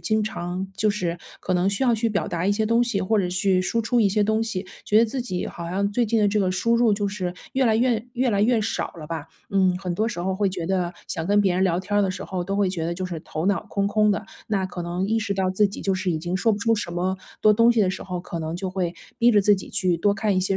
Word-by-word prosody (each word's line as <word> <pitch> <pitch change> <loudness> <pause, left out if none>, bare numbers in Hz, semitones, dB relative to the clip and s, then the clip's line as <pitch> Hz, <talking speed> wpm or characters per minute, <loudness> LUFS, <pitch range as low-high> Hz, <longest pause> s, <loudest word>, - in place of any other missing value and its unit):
经 215 -1 +1
常 180 -2 -4
就 215 0 +2
是 175 -4 -2 0.2
可 185 - -1
能 180 +2 +2
需 200 +7 0
要 240 -2 +4
去 225 +1 0
表 205 -2 -1
达 170 0 -2
一 - - +3
些 215 +2 +1
东 230 +2 +3
西， 235 -5 0
或 210 +3 +1
者 185 -3 +1
去 185 +1 +2
输 230 +5 0
出 240 +2 +2
一 205 - +4
些 205 +1 +2
东 220 +1 +1
西， 195 -4 -3 0.2
觉 210 - +4
得 230 - +6
自 250 +3 -3
己 185 -7 -3
好 170 -1 -7
像 200 +2 0
最 240 +2 +2
近 225 +1 +1
的 205 - +4
这 210 +1 +1
个 185 - +1
输 230 +6 +1
入， 235 -2 +4
就 205 0 0
是 190 -3 -3 0.2
越 265 0 +2
来 220 -2 +3
越 235 -2 +1
越 255 +1 +1
来 200 0 +2
越 230 0 +3
少 210 - -2
了 155 - -8
吧。 160 -2 -5 0.2
嗯， 190 -2 +3
很 180 -2 -3
多 220 +5 0
时 235 - -6
候 185 +2 -1
会 200 0 +1
觉 180 -3 -4
得， 180 -2 0
想 160 - -3
跟 205 +1 +4
别 190 -3 +2
人 185 - +1
聊 175 -2 +2
天 205 +2 -2
儿 205 - +4
的 190 - +1
时 - - -6
候， 185 -2 -3
都 195 +2 -3
会 200 -2 +2
觉 170 -3 -3
得 170 - -1
就 185 +1 -3
是 170 -3 -5
头 155 +3 -4
脑 200 +1 +1
空 200 -1 0
空 210 0 +3
的。 - - -1 0.2
那 195 -4 0
可 175 -1 -6
能 175 +3 -2
意 225 +2 +1
识 210 -2 -2
到 190 -1 0
自 205 +2 +3
己 195 - -7
就 195 -1 0
是 185 0 -1
已 160 - 0
经 175 +3 -2
说 225 +3 +2
不 205 - -2
出 230 +2 +2
什 195 -5 -4
么 185 +2 -1 0.2
多 215 - +6
东 230 +3 +5
西 230 - +2
的 185 -2 +3
时 190 - -6
候， 180 -2 -4
可 175 -1 -6
能 160 +1 -4
就 185 0 -4
会 180 -2 -2 0.2
逼 240 -1 +5
着 210 -2 +5
自 205 +1 +5
己 - - -8
去 180 -3 +1
多 200 +4 +2
看 200 -1 0
一 - - +3
些 190 +1 0
195 Hz, 330 characters per minute, -24 LUFS, 185-215 Hz, 0.2 s, 得